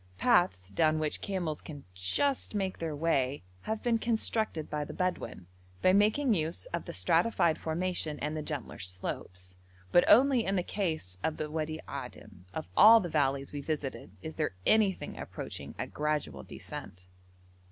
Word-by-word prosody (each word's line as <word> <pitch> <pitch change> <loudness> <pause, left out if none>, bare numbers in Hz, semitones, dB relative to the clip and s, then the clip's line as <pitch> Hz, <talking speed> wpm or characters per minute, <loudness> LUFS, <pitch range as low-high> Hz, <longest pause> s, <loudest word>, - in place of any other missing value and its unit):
Paths 95 - +3
down 155 +11 +2
which 155 -1 -2
camels 175 -6 -2
can 145 -3 -9
just 215 - 0
make 190 -2 -1
their 160 -2 -3
way 145 - +1 0.2
have 220 0 -3
been 235 -2 +2
constructed 220 -7 0
by 150 -1 -2
the - - -8
Bedouin, 180 - -2 0.4
by 185 - +6
making 220 +6 +4
use 165 - -1
of - - -2
the - - -5
stratified 170 -8 +2
formation 165 -2 -2
and 150 +2 -3
the 155 - -2
gentler 145 -5 -5
slopes; 90 0 -5 0.4
but 175 - +6
only 255 0 +6
in 195 -1 0
the 180 - +1
case 160 - -3
of 160 - -1
the 150 -1 -4
Wadi 155 0 -2
Adim, 90 - -8
of 95 - -5
all 225 +2 +9
the 180 -5 -3
valleys 140 -3 0
we 145 - -3
visited, 140 -7 -4
is 160 - -6
there 155 -11 -1
anything 215 -4 +2
approaching - - -7
a - - -2
gradual 150 - -2
descent. 90 +6 -9
155 Hz, 165 wpm, -31 LUFS, 140-195 Hz, 0.4 s, all